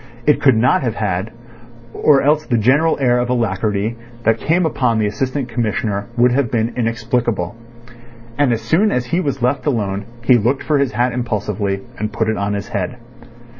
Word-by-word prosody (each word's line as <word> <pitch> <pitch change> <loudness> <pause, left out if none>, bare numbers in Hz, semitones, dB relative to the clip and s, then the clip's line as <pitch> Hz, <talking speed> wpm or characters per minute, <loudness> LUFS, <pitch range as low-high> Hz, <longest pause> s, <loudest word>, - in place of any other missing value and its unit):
It 150 - +3
could 135 -4 +5
not 120 +3 +3
have 120 -4 -2
had, 100 -1 -2 0.6
or 140 -3 +3
else 150 +2 +2
the 120 - +1
general 140 +9 +3
air 125 -2 +3
of 120 0 -1
alacrity 110 -2 -1 0.3
that 115 0 +2
came 170 +3 +1
upon 125 -7 +1
the 110 - +1
Assistant 130 +6 -2
Commissioner 110 -3 -2
would 120 +1 +4
have 130 -1 +1
been 115 0 -1
inexplicable. 115 -5 -1 0.8
As 120 -6 +2
soon 185 - +2
as 125 0 0
he 170 +8 0
was 140 -7 -2
left 135 +4 0
alone 105 -6 -1 0.2
he 120 0 +5
looked 125 +6 0
for 150 -2 +1
his 140 -5 0
hat 120 +2 +1
impulsively, 105 -4 -2 0.2
and 105 0 -2
put 110 0 -1
it 110 - 0
on 100 +1 -1
his 100 0 -5
head. 100 +5 -3
120 Hz, 180 wpm, -18 LUFS, 105-130 Hz, 0.8 s, could